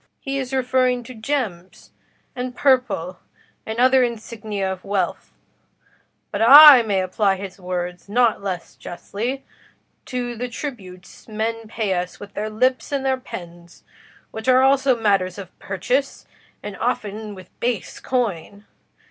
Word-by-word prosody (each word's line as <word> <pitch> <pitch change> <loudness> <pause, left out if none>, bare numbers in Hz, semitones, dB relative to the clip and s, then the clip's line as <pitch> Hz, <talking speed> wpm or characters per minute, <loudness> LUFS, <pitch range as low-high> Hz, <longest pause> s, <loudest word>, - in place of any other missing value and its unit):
"He 275 0 -3
is 260 -1 -4
referring 255 -1 +1
to 255 - -10
gems, 220 -7 -4 0.4
and 250 0 -4
purple, 245 - +1 0.5
and 220 +1 -4
other 260 +1 +5
insignia 215 -4 -3
of 185 - -12
wealth; 195 -3 -2 1.0
but - - -3
I 280 +2 +11
may 205 -4 0
apply 195 +2 +1
his 195 0 -8
words 180 0 -5
not 235 0 +2
less 185 -3 -5
justly 235 +9 -5 0.6
to 245 -1 -3
the 245 +2 -4
tributes 195 -10 -9
men 225 +1 -3
pay 215 -3 -2
us 180 0 -3
with 200 0 -11
their 215 +1 -3
lips 255 +6 0
and 275 -1 -1
their 265 -1 +1
pens, 175 -6 -11 0.5
which 220 +2 -7
are 255 0 +5
also 270 -2 +3
matters 195 -4 +1
of 190 -3 -11
purchase, 245 +9 -2 0.4
and 205 -1 -6
often 215 -3 -3
with 185 -1 -13
base 240 -3 -2
coin. 205 -5 -3
220 Hz, 140 wpm, -22 LUFS, 195-255 Hz, 1.0 s, I